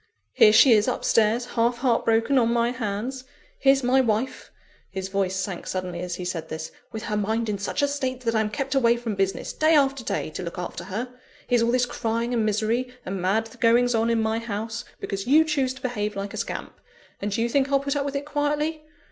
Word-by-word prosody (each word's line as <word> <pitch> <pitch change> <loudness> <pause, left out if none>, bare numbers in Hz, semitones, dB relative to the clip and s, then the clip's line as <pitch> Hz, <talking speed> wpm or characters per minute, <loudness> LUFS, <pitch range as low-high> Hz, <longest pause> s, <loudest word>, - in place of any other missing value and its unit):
Here 215 - +7
she 245 +4 +7
is 215 0 +5
up 255 - -1
stairs, 225 +2 +3
half 235 +1 +2
heart 245 -2 +1
broken, 230 +4 +3
on 230 -1 +2
my 235 0 +2
hands; 240 +2 -4 0.4
here's 270 0 +4
my 255 +2 +4
wife" 235 +2 -1 0.4
(his 190 0 -5
voice 195 -1 0
sank 190 -2 -4
suddenly 185 -2 -3
as 180 0 -4
he 180 - -6
said 165 -3 -4
this) 160 0 -5 0.2
"with 220 -1 -6
her 210 - -2
mind 220 +2 0
in 205 -2 -2
such 200 +8 -2
a - - +4
state 260 -3 -3
that 230 -2 -1
I'm 220 -1 +1
kept 270 +4 -3
away 240 -3 +4
from 235 -2 -3
business, 195 -1 -1
day 315 +1 +3
after 275 -3 +2
day, 155 - -2
to - - -6
look 170 -1 -6
after 175 -1 -5
her; 230 +7 -4 0.3
here's 245 -2 +2
all 230 - +2
this 250 +1 +3
crying 230 0 -2
and 230 -2 +1
misery 220 +4 0
and 190 0 -4
mad 220 +5 0
goings 245 +1 +4
on 225 0 +2
in 230 -1 +2
my 220 0 0
house, 225 0 -4 0.2
because 195 +1 -4
you 305 +5 +6
choose 280 -5 0
to - - -14
behave 210 -4 -2
like 200 +1 -4
a - - -6
scamp 230 - -5 0.4
and 205 +1 -2
do 210 - -1
you - - +1
think 275 +3 +1
I'll 275 - +4
put 280 +1 -2
up 285 - 0
with 280 0 -4
it 280 +1 -2
quietly? 300 +1 -1
230 Hz, 230 wpm, -25 LUFS, 205-255 Hz, 0.4 s, Here